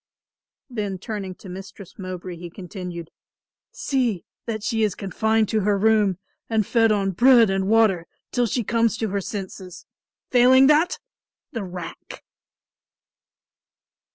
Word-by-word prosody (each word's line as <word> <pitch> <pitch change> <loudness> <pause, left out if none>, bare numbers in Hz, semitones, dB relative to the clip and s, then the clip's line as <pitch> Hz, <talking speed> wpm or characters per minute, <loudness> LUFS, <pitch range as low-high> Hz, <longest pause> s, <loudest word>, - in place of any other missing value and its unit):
Then 210 -7 -3
turning 195 -2 -5
to 195 - -14
Mistress 190 +1 -10
Mowbray 185 -1 -6
he 175 +1 -8
continued, 180 -2 -8 0.6
"See 245 -9 -1 0.2
that 220 -2 -3
she 225 0 0
is 210 -3 +1
confined 220 +3 0
to 220 - +1
her 205 0 +1
room 210 -3 +3 0.3
and 220 -2 +1
fed 225 +1 +3
on 200 -2 +1
bread 235 +1 +6
and 195 0 0
water 210 -6 +3 0.2
till 245 -1 +1
she 240 +2 -1
comes 230 +1 +1
to 220 -1 -2
her 200 +1 -1
senses. 190 -2 -7 0.5
Failing 255 +1 +6
that, 300 +5 +4 0.5
the 225 -4 -4
rack!" 180 -2 -8
210 Hz, 130 wpm, -23 LUFS, 185-225 Hz, 0.6 s, bread